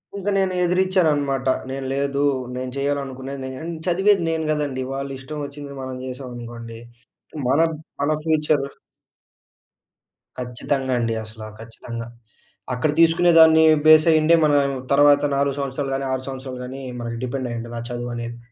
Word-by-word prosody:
ఇంక 200 0 -6
నేను 190 -1 +1
ఎదిరిచ్చాననమాట. 165 -7 +1 0.2
నేను 135 0 -4
లేదూ. 140 0 -1 0.3
నేను 130 0 -4
చెయ్యాలనుకునేది 140 -1 -3
నేను 130 0 -6
అన్ 170 +1 -4
చదివేది 195 +1 +3
నేను 160 -1 -1
గదండీ. 145 -4 -1
వాళ్ళు 135 0 -4
ఇష్టవొచ్చింది 145 0 -7
మనం 130 0 -5
చేశామనుకోండి, 120 -3 -8 0.7
మన 140 +4 +3 0.4
మన 145 +2 +1
ఫ్యూచర్. 150 -3 +1 1.7
ఖచ్చితంగా 130 +2 -2
అండి 115 -1 0
అసలా. 110 0 -10
ఖచ్చితంగా. 115 +1 -8 0.7
అక్కడ 125 +5 0
తీసుకునే 165 +1 +5
దాన్నీ 160 0 +7 0.2
బేసయ్యుండే 155 +1 +6
మనం 145 -1 +4 0.3
తర్వాత 145 0 +5
4 140 0 +1
సంవత్సరాలు 140 0 -3
గానీ, 135 0 -2
6 130 0 -3
సంవత్సరాలు 130 -1 -6
గానీ, 135 +2 -7 0.2
మనకి 115 0 -4
డిపెండయ్యుంటుంది 120 -2 -4
ఆ - - -5
చదువనేది. 120 -1 -5
135 Hz, 125 wpm, -22 LUFS, 125-155 Hz, 1.7 s, దాన్నీ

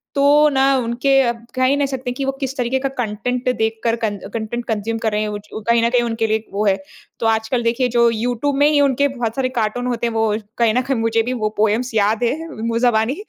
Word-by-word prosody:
तो 280 - +2 0.3
ना 265 0 +3
उनके 255 +3 +2
अ, 240 - +2 0.2
कह 255 - +1
ही 260 +2 +4
नहीं 285 -1 +1
सकते 260 -2 -4
कि 270 +2 -4
वो 270 - +1
किस 270 -1 -3
तरीके 250 +2 0
का 275 +1 -1
कंटेंट 245 +4 -3
देखकर 225 +1 0
कन 220 -3 -2 0.2
कंटेंट 230 +1 -4
कंज्यूम 225 +1 -2
कर 220 -2 -1
रहे 210 0 0
हैं, 215 - -1
वो 210 - -4
जो 210 +1 -9
कहीं 235 0 +4
न 235 - +3
कहीं 245 0 +2
उनके 225 -1 -1
लिए 220 - +1
1 220 - -14
वो 205 +2 0
है। 195 -2 +4 0.4
तो - - -2
आजकल 225 +2 0
देखिए, 235 +2 +1
जो 235 -1 +3
यूट्यूब 245 +5 -1
में 290 - +5
ही 295 - +3
उनके 280 0 +3
बहुत 240 -4 -3
सारे 260 -1 0
कार्टून 240 0 -2
होते 240 -1 -1
हैं, 230 - -3
वो 220 -1 +1 0.2
कहीं 230 -2 +3
न 250 - +2
कहीं 270 -1 -1
मुझे 225 0 +1
भी 250 +2 -2
वो 215 -3 -1
पोएम्स 220 +4 +1
याद 215 +3 +2
हैं 315 +7 -1
मुँह 230 -3 -2
ज़बानी। 235 +1 +2
235 Hz, 255 wpm, -19 LUFS, 220-255 Hz, 0.4 s, में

